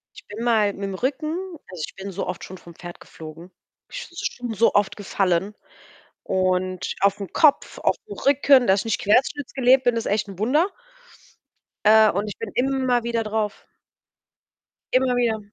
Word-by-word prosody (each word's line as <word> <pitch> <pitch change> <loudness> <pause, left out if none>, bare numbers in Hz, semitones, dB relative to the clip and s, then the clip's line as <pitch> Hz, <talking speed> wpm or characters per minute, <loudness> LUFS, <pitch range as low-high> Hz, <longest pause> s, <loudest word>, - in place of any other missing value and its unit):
Ich - - -14
bin 215 +3 -7
mal 215 -4 +2
mit 200 - -8
'm 190 - -5
Rücken 305 - -2 0.3
also 180 -4 -7
ich - - -15
bin 195 +1 -7
so 195 +1 -4
oft 180 - -5
schon 185 - -9
vom 170 -1 -15
Pferd 175 0 -10
geflogen. 160 +2 -11 0.4
Ich - - -7
bin 345 - -17 0.3
schon 225 - -3
so 230 +3 +3
oft 205 -1 +1
gefallen, 195 -1 -1 0.7
und 185 -1 -1
auf 200 +1 +2
'n 200 -3 -7
Kopf, 305 -4 +3
auf - - +1
'n 415 - -7
Rücken. 275 -2 +4
Dass 190 0 +3
ich - - -9
nicht 225 - -1
querschnittsgelähmt 260 +2 +2
bin, 245 -1 +2
ist 230 - -2
echt 210 0 0
'n 195 -2 -10
Wunder. 285 - +2 1.2
Äh, 215 0 +7
und 200 +3 -2
ich 205 - -7
bin - - -6
immer 260 -2 +1
wieder 235 -1 -1
drauf. 215 -1 -3 1.3
Immer 255 -1 +3
wieder. 235 -3 +1
215 Hz, 180 wpm, -23 LUFS, 195-250 Hz, 1.3 s, Äh